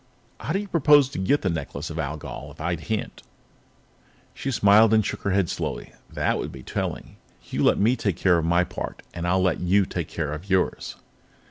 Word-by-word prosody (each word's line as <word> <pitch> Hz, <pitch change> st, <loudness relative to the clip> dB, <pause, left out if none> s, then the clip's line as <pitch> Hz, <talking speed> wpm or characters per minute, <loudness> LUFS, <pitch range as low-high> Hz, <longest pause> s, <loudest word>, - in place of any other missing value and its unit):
How 155 Hz, -, -3 dB
do -, -, +2 dB
you 205 Hz, +1 st, -4 dB
propose 145 Hz, -5 st, +5 dB
to 135 Hz, -, -6 dB
get 140 Hz, +10 st, +1 dB
the 95 Hz, -, +1 dB
Necklace 80 Hz, -1 st, -5 dB
of 80 Hz, -, -5 dB
Algol 75 Hz, -2 st, -5 dB
if 70 Hz, -, -15 dB
I 85 Hz, +3 st, -1 dB
can't?" 105 Hz, +7 st, -4 dB, 1.1 s
She 135 Hz, -, -4 dB
smiled 110 Hz, -1 st, +5 dB
and 110 Hz, -2 st, +3 dB
shook -, -, -4 dB
her 100 Hz, -, -1 dB
head 95 Hz, -2 st, +2 dB
slowly. -, -, -4 dB, 0.2 s
"That -, -, 0 dB
would -, -, -4 dB
be 65 Hz, -, -10 dB
telling. -, -, -4 dB, 0.3 s
You -, -, 0 dB
let -, -, +4 dB
me 115 Hz, +5 st, +3 dB
take 100 Hz, -8 st, -2 dB
care 90 Hz, -3 st, +3 dB
of 80 Hz, -, -2 dB
my 85 Hz, +2 st, +3 dB
part, 90 Hz, -, -6 dB
and 85 Hz, 0 st, -4 dB
I'll 95 Hz, +1 st, +2 dB
let 95 Hz, -, +1 dB
you 95 Hz, +2 st, +3 dB
take 85 Hz, -3 st, -4 dB
care 75 Hz, -3 st, -3 dB
of 85 Hz, +6 st, -8 dB
yours." 95 Hz, -1 st, 0 dB
95 Hz, 210 wpm, -24 LUFS, 85-110 Hz, 1.1 s, propose